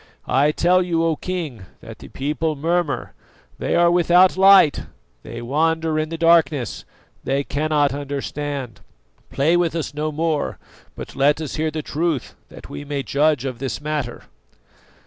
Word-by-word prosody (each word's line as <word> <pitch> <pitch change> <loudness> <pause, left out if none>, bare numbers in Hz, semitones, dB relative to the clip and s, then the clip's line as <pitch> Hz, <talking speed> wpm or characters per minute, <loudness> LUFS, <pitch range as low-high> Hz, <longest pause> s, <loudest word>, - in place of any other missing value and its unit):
I 145 +3 +2
tell 180 +4 +3
you, 170 -2 0
O 165 -1 +1
King, 155 - -5 0.2
that - - -11
the - - -11
people 150 +3 -2
murmur; 165 +1 -1 0.5
they - - -1
are 170 0 +4
without 175 +1 +4
light, 190 -5 +6 0.4
they - - -8
wander 160 +4 0
in 155 0 -2
the 165 - -5
darkness, 160 -7 +2 0.4
they 135 +2 0
cannot 145 -1 0
understand. 140 -2 -5 0.5
Play 155 +5 +2
with 175 -2 +1
us 160 -3 -3
no 155 +1 -2
more, 155 0 -1 0.4
but - - -9
let 145 +3 +3
us 155 -4 -5
hear 155 +1 0
the 155 -1 -5
truth 155 -3 -2 0.2
that - - -12
we - - -7
may 140 -1 -3
judge 145 +1 +1
of 130 -3 -4
this 135 0 -4
matter." 145 -5 -4
155 Hz, 155 wpm, -21 LUFS, 140-165 Hz, 0.5 s, light